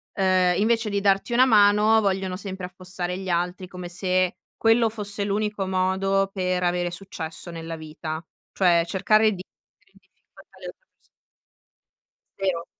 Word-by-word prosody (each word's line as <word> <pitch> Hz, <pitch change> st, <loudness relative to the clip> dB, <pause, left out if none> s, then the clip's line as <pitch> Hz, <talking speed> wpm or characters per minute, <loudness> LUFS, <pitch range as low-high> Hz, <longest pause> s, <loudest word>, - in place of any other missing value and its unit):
uhm, 185 Hz, -2 st, +3 dB
invece 225 Hz, +1 st, +1 dB
di 200 Hz, 0 st, 0 dB
darti 195 Hz, +3 st, +2 dB
una 255 Hz, +2 st, +6 dB
mano 210 Hz, -1 st, +5 dB
vogliono 190 Hz, -2 st, -1 dB
sempre 190 Hz, -1 st, -6 dB
affossare 180 Hz, 0 st, -5 dB
gli 190 Hz, -1 st, -6 dB
altri, 180 Hz, +2 st, -2 dB
come 180 Hz, -2 st, -7 dB
se 185 Hz, 0 st, 0 dB, 0.2 s
quello 225 Hz, 0 st, +3 dB
fosse 205 Hz, -2 st, -3 dB
l'unico 210 Hz, -1 st, -1 dB
modo 190 Hz, +1 st, +1 dB
per 185 Hz, -1 st, -1 dB
avere 175 Hz, 0 st, 0 dB
successo 175 Hz, -2 st, -7 dB
nella 165 Hz, 0 st, -6 dB
vita. 155 Hz, 0 st, -6 dB, 0.3 s
Cioè 175 Hz, -3 st, +3 dB
cercare 215 Hz, +5 st, +3 dB
di 185 Hz, -, -6 dB
mettere -, -, -39 dB
in -, -, -22 dB
difficoltà -, -, -22 dB
le -, -, -11 dB
altre -, -, -8 dB
perso -, -, -41 dB, 1.6 s
0. 180 Hz, -3 st, -1 dB
190 Hz, 150 wpm, -24 LUFS, 180-205 Hz, 1.6 s, una